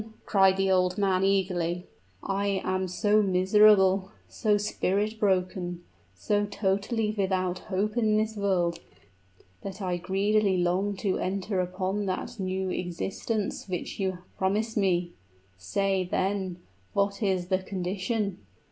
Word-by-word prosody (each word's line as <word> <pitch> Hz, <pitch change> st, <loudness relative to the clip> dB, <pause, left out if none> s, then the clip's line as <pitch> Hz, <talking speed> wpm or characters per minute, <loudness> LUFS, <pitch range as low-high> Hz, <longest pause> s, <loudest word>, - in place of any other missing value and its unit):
cried 190 Hz, -1 st, +4 dB
the 195 Hz, 0 st, +2 dB
old 180 Hz, -1 st, +2 dB
man, 190 Hz, -2 st, +2 dB
eagerly. 180 Hz, -3 st, 0 dB, 0.4 s
"I 195 Hz, 0 st, 0 dB
am 185 Hz, 0 st, 0 dB
so 205 Hz, +4 st, +2 dB
miserable 190 Hz, 0 st, +4 dB, 0.2 s
so 210 Hz, -3 st, +1 dB
spirit 210 Hz, +1 st, -1 dB
broken 180 Hz, -3 st, 0 dB, 0.3 s
so 205 Hz, -1 st, 0 dB
totally 205 Hz, +2 st, 0 dB
without 185 Hz, -2 st, 0 dB
hope 205 Hz, +3 st, 0 dB
in 215 Hz, -3 st, +2 dB
this 220 Hz, 0 st, 0 dB
world, 180 Hz, -4 st, 0 dB, 0.8 s
that 195 Hz, 0 st, -7 dB
I 180 Hz, -3 st, -1 dB
greedily 195 Hz, +2 st, +1 dB
long 185 Hz, +3 st, +1 dB
to 195 Hz, 0 st, -1 dB
enter 195 Hz, +1 st, -2 dB
upon 185 Hz, +3 st, -2 dB
that 185 Hz, +4 st, -4 dB
new 190 Hz, 0 st, -2 dB
existence 195 Hz, +4 st, -3 dB
which 180 Hz, +2 st, -4 dB
you 190 Hz, -2 st, -1 dB, 0.2 s
promised 210 Hz, +4 st, 0 dB
me! 180 Hz, -4 st, +1 dB, 0.5 s
Say, 190 Hz, -, 0 dB
then, 190 Hz, -2 st, -1 dB, 0.4 s
what 200 Hz, +2 st, 0 dB
is 185 Hz, -3 st, 0 dB
the 185 Hz, -1 st, +2 dB
condition?" 190 Hz, +2 st, -2 dB
190 Hz, 125 wpm, -27 LUFS, 185-205 Hz, 0.8 s, cried